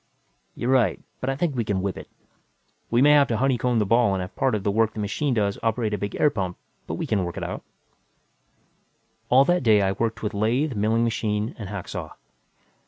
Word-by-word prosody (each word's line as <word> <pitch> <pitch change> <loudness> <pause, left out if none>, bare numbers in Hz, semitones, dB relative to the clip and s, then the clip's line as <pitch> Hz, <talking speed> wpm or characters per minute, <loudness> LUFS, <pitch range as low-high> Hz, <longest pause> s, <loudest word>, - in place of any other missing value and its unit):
"You're 125 - -1
right, 120 -9 +3 0.2
but 130 - -2
I 135 - 0
think 150 0 -1
we 120 - 0
can 100 -3 -1
whip 100 -2 -2
it. - - -9 0.8
We 120 +2 +3
may 145 - +6
have 145 -1 +6
to 115 - -1
honeycomb 125 -2 +1
the 105 - +2
ball 115 -1 +3
and 95 - -2
have 90 +2 -7
part 130 -4 +1
of 100 - -3
the 100 - +1
work 110 +1 +1
the - - -5
machine 120 +6 -1
does 100 -2 0
operate 115 -1 0
a - - 0
big 100 0 -4
hot - - -4
air 150 - +6
pump; 95 -4 -3 0.3
but - - -3
we - - -3
can 100 -3 0
work 85 -1 -5
it - - -4
out." - - -4 1.7
All 130 +2 +6
that 175 +3 +2
day, 110 -4 +4
I 95 - +2
worked 115 +3 -2
with 105 - -2
lathe, 120 +8 0
milling 110 +3 +1
machine 110 -1 -1
and 100 -4 -6
hacksaw. 100 -3 -6
110 Hz, 225 wpm, -24 LUFS, 100-125 Hz, 1.7 s, may